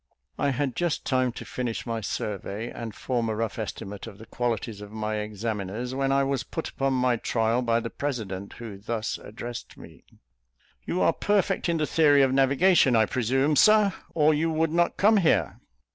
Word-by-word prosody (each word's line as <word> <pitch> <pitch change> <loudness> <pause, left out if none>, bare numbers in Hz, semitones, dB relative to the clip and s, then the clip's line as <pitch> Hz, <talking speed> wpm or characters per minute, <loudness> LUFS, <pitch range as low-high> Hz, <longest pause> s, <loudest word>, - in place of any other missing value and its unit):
I 145 - +2
had 135 -1 -1
just 175 -3 -1
time 130 -1 +1
to - - -8
finish 120 -3 -4
my 115 -2 -3
survey, 105 +2 -4
and 115 -3 -7
form 120 -3 -1
a 110 - -1
rough 115 0 -3
estimate 105 -2 -6
of 100 - -10
the 110 - -12
qualities 115 -4 -3
of 105 0 -9
my 110 0 -3
examiners, 105 +2 -4
when 135 0 0
I 140 0 +3
was 135 -2 0
put 160 +5 -5
upon 135 0 -1
my 125 -1 +2
trial 115 +1 0
by 115 -1 +2
the 115 - -5
president, 105 -9 -4
who 110 -4 -9
thus 110 +2 -3
addressed 120 +2 -8
me, - - -14 0.8
"You 180 - -1
are - - +4
perfect 200 -3 +1
in 170 - +1
the 155 - +1
theory 145 -3 +4
of 130 -1 +2
navigation, 135 +1 +4
I 110 -1 +5
presume, 135 +5 +1
Sir, 210 +1 +5 0.2
or 155 -1 +4
you 160 +2 +1
would 160 0 +1
not 170 +1 +1
come 215 +2 +5
here?" 170 -5 +2
125 Hz, 190 wpm, -26 LUFS, 110-145 Hz, 0.8 s, I